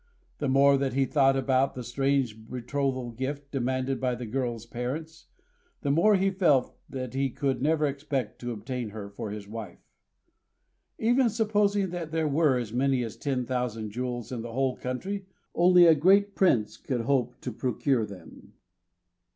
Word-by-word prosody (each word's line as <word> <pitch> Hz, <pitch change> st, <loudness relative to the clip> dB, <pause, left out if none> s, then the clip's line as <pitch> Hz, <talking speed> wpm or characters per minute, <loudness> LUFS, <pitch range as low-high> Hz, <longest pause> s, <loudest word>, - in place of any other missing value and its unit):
The 145 Hz, -, -1 dB
more 140 Hz, +1 st, +5 dB
that 135 Hz, -2 st, -1 dB
he 135 Hz, +1 st, +2 dB
thought 135 Hz, +1 st, +3 dB
about 130 Hz, 0 st, +1 dB
the 125 Hz, -, -5 dB
strange 125 Hz, -3 st, -1 dB
betrothal 130 Hz, 0 st, -2 dB
gift 140 Hz, +4 st, -5 dB
demanded 130 Hz, 0 st, -1 dB
by 125 Hz, -1 st, 0 dB
the 120 Hz, 0 st, -6 dB
girl's 120 Hz, -1 st, -3 dB
parents, 135 Hz, +8 st, -5 dB, 0.5 s
the 140 Hz, -, 0 dB
more 180 Hz, +8 st, +5 dB
he 195 Hz, 0 st, +2 dB
felt 160 Hz, -9 st, +2 dB
that 130 Hz, -2 st, -5 dB
he 135 Hz, 0 st, 0 dB
could 130 Hz, 0 st, -2 dB
never 155 Hz, +1 st, +2 dB
expect 140 Hz, -5 st, -3 dB
to 120 Hz, 0 st, -4 dB
obtain 120 Hz, +1 st, -4 dB
her 100 Hz, -1 st, -8 dB
for 110 Hz, +1 st, -6 dB
his 105 Hz, -1 st, -7 dB
wife. 110 Hz, 0 st, -7 dB, 1.2 s
Even 240 Hz, +2 st, +3 dB
supposing 205 Hz, -3 st, +1 dB
that 170 Hz, -3 st, -5 dB
there 160 Hz, -1 st, 0 dB
were 145 Hz, -2 st, +3 dB
as 115 Hz, -3 st, -4 dB
many 130 Hz, 0 st, +2 dB
as 115 Hz, -, -6 dB
ten 130 Hz, -3 st, -2 dB
thousand 120 Hz, -4 st, -2 dB
jewels 120 Hz, +1 st, -4 dB
in 120 Hz, -3 st, -3 dB
the 115 Hz, 0 st, -7 dB
whole 130 Hz, 0 st, 0 dB
country, 190 Hz, +10 st, -4 dB, 0.3 s
only 180 Hz, 0 st, +6 dB
a 165 Hz, -, +8 dB
great 195 Hz, +6 st, +4 dB
prince 125 Hz, -, +2 dB
could 125 Hz, -3 st, -2 dB
hope 125 Hz, -1 st, 0 dB
to 125 Hz, -, -4 dB
procure 125 Hz, +1 st, 0 dB
them. 100 Hz, -3 st, -11 dB
130 Hz, 165 wpm, -28 LUFS, 120-150 Hz, 1.2 s, a